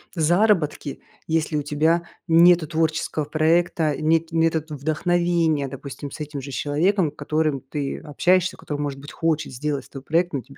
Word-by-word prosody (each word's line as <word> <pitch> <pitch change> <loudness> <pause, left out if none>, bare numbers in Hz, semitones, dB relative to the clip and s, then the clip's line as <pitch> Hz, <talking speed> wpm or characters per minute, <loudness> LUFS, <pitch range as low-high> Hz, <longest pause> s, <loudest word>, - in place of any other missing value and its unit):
заработки, 170 -3 +1 0.3
если 160 -1 0
у 145 - -1
тебя 160 +4 +1 0.2
нету 170 0 +6
творческого 155 -1 -1
проекта, 155 0 +1
нет 165 +1 +2
нету 165 -1 +2
в 150 - -6
вдохновения, 165 -2 +1
допустим, 140 +1 -8
с - - -9
этим 150 -2 -5
же 140 +1 -8
человеком, 160 +5 +1
которым 155 -2 -1
ты 140 0 -4
общаешься, 180 +4 +1
который, 145 -1 -5
может 140 -2 -3
быть, 145 - -10
хочет 155 -3 -1
сделать 145 +2 -3
с - - -20
тобой 135 -1 -9
проект, 170 +1 +1
но 140 - -1
тебе - - -17
155 Hz, 165 wpm, -23 LUFS, 145-165 Hz, 0.3 s, нету